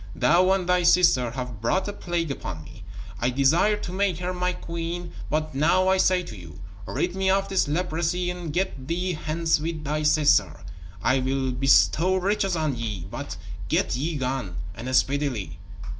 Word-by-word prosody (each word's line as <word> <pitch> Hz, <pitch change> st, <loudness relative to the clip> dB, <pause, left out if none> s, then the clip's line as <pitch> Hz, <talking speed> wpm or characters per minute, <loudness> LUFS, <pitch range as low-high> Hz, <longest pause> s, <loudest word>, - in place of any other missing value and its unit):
Thou 170 Hz, +9 st, +4 dB
and 190 Hz, -2 st, +1 dB
thy 180 Hz, 0 st, +3 dB
sister 170 Hz, -8 st, +4 dB
have 125 Hz, -3 st, -6 dB
brought 185 Hz, -, 0 dB
a 205 Hz, -, -3 dB
plague 170 Hz, -5 st, -2 dB
upon 80 Hz, -11 st, -6 dB
me. -, -, -13 dB, 0.4 s
I 120 Hz, -, +1 dB
desired 160 Hz, +11 st, +2 dB
to -, -, -4 dB
make 190 Hz, -2 st, 0 dB
her 180 Hz, 0 st, -3 dB
my 180 Hz, 0 st, 0 dB
queen, 170 Hz, 0 st, -5 dB, 0.2 s
but 155 Hz, -1 st, -1 dB
now 185 Hz, +7 st, +3 dB
I 190 Hz, -, +4 dB
say 185 Hz, -1 st, +3 dB
to 115 Hz, -, -9 dB
you: 85 Hz, -6 st, -11 dB, 0.3 s
Rid 180 Hz, -, -2 dB
me 190 Hz, 0 st, +1 dB
of 195 Hz, +1 st, +1 dB
this 190 Hz, -5 st, +1 dB
leprosy 175 Hz, +2 st, -1 dB
and 175 Hz, -3 st, -6 dB
get 145 Hz, -6 st, -2 dB
thee 180 Hz, +3 st, -1 dB
hence 160 Hz, +1 st, 0 dB
with 160 Hz, 0 st, -4 dB
thy 150 Hz, +1 st, -1 dB
sister. 150 Hz, -1 st, +3 dB, 0.4 s
I 130 Hz, +1 st, +3 dB
will 130 Hz, 0 st, -1 dB
bestow 140 Hz, +7 st, +3 dB
riches 195 Hz, 0 st, 0 dB
on 155 Hz, -4 st, -1 dB
ye, 105 Hz, -7 st, -4 dB
but -, -, -6 dB, 0.3 s
get -, -, +1 dB
ye 155 Hz, +6 st, -2 dB
gone, 130 Hz, -8 st, -3 dB, 0.2 s
and 120 Hz, +5 st, -3 dB
speedily." 130 Hz, -, 0 dB
160 Hz, 175 wpm, -25 LUFS, 130-180 Hz, 0.4 s, Thou